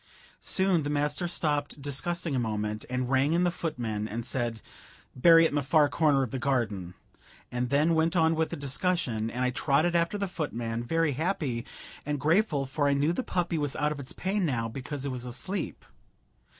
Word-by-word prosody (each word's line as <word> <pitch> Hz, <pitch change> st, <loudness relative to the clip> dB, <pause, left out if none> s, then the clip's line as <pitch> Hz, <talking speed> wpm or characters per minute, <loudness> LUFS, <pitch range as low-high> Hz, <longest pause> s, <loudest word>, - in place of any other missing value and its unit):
Soon 190 Hz, -3 st, +2 dB
the 145 Hz, -, -3 dB
master 145 Hz, +4 st, 0 dB
stopped 150 Hz, -4 st, -1 dB
discussing 150 Hz, +3 st, -2 dB
a -, -, +1 dB
moment, 105 Hz, -2 st, -2 dB
and 125 Hz, 0 st, -1 dB
rang 135 Hz, +4 st, +2 dB
in 175 Hz, +1 st, +3 dB
the 175 Hz, -, +2 dB
footman, 115 Hz, -11 st, -3 dB
and 115 Hz, +1 st, -5 dB
said, 120 Hz, -3 st, -2 dB, 0.6 s
"Bury 165 Hz, +5 st, +7 dB
it -, -, +3 dB
in -, -, -9 dB
the 145 Hz, -, +1 dB
far 145 Hz, +2 st, +4 dB
corner 145 Hz, -3 st, +3 dB
of 125 Hz, -, -4 dB
the 130 Hz, -, -3 dB
garden," 110 Hz, -9 st, -1 dB, 0.6 s
and 125 Hz, 0 st, -2 dB
then 150 Hz, +5 st, +3 dB
went 160 Hz, +2 st, +2 dB
on 160 Hz, -1 st, +4 dB
with 160 Hz, 0 st, 0 dB
the -, -, -4 dB
discussion, 140 Hz, -, -1 dB
and 125 Hz, +2 st, -1 dB
I 125 Hz, -, +1 dB
trotted 155 Hz, +7 st, +2 dB
after 170 Hz, +4 st, +1 dB
the 200 Hz, -1 st, -1 dB
footman, 120 Hz, -9 st, -3 dB
very 165 Hz, +4 st, +1 dB
happy 145 Hz, -5 st, -2 dB, 0.4 s
and 145 Hz, 0 st, -2 dB
grateful, 155 Hz, -1 st, +2 dB
for 145 Hz, +2 st, 0 dB
I 140 Hz, -, +3 dB
knew 145 Hz, +4 st, +2 dB
the 175 Hz, -, -1 dB
puppy 175 Hz, -7 st, -1 dB
was 145 Hz, -2 st, -1 dB
out 150 Hz, 0 st, +1 dB
of 150 Hz, -, -4 dB
its 130 Hz, -, -6 dB
pain 195 Hz, +2 st, -1 dB
now, 120 Hz, -8 st, 0 dB
because 135 Hz, +4 st, -5 dB
it 140 Hz, -, -2 dB
was 125 Hz, -1 st, -5 dB
asleep. 160 Hz, +10 st, -3 dB
145 Hz, 200 wpm, -28 LUFS, 125-165 Hz, 0.6 s, Bury